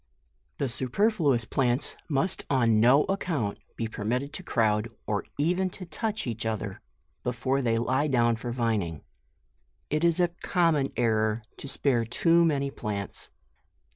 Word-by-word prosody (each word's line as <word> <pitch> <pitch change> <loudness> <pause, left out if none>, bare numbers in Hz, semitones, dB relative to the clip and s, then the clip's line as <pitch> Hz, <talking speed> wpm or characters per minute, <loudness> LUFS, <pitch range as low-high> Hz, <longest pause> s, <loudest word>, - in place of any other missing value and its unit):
The 140 - 0
superfluous 140 - +1
plants 125 +2 +1
must 145 +5 +1
on 115 -5 +3
no 125 +6 +6
account 160 - -2 0.2
be 115 - -2
permitted 125 +7 -2
to 190 - -6
crowd, 110 -8 +1 0.2
or 105 -1 -1
even 180 +5 +1
to 185 - -7
touch 215 +6 -3
each 115 -2 -3
other, 110 -3 -3 0.4
before 125 +3 0
they 115 -3 +1
lie 130 +5 +1
down 120 -4 +3
for 120 +2 -5
vining. 110 -10 -1 0.9
It 155 +2 +1
is 170 0 +3
a 175 -1 +3
common 165 -6 +2
error 110 -1 +1
to - - -7
spare 135 -3 +2
too 165 +9 +3
man) 140 -4 +1
plants. 100 -5 -4
125 Hz, 140 wpm, -27 LUFS, 115-155 Hz, 0.9 s, no